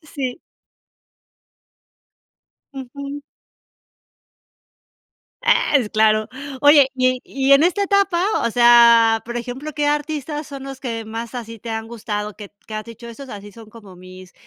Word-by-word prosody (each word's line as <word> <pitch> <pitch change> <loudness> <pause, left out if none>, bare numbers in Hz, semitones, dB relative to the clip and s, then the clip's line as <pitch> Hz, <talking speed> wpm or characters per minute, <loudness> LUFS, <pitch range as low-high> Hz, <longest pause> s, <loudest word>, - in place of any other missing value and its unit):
Sí. 275 -2 -5 2.3
Ujú. 280 +2 -8 2.2
¡Ah! - - +2
Es 235 -6 -1
claro. 215 0 +2 0.3
Oye, 290 -2 +6
y 255 -1 +1
y 275 0 0
en 275 +2 +6
esta 365 +4 +1
etapa, 395 -3 +1 0.2
o - - -1
sea, 235 -1 +5
por 240 0 -5
ejemplo, 255 +6 -6
¿qué 295 -1 -1
artistas 295 0 -2
son 275 -2 -9
los 270 -1 -8
que 230 -3 -5
más 225 +2 -7
así 230 -2 -7
te 230 +2 -8
han 220 0 -4
gustado? 210 -2 -5
Que 205 -2 -11 0.2
que 215 - -8
has 215 - -4
dicho 230 0 -12
esos 260 +3 -10
así 205 -2 -10
son 225 -2 -14
como 205 -5 -14
mis 185 0 -14
240 Hz, 140 wpm, -20 LUFS, 220-280 Hz, 2.3 s, Oye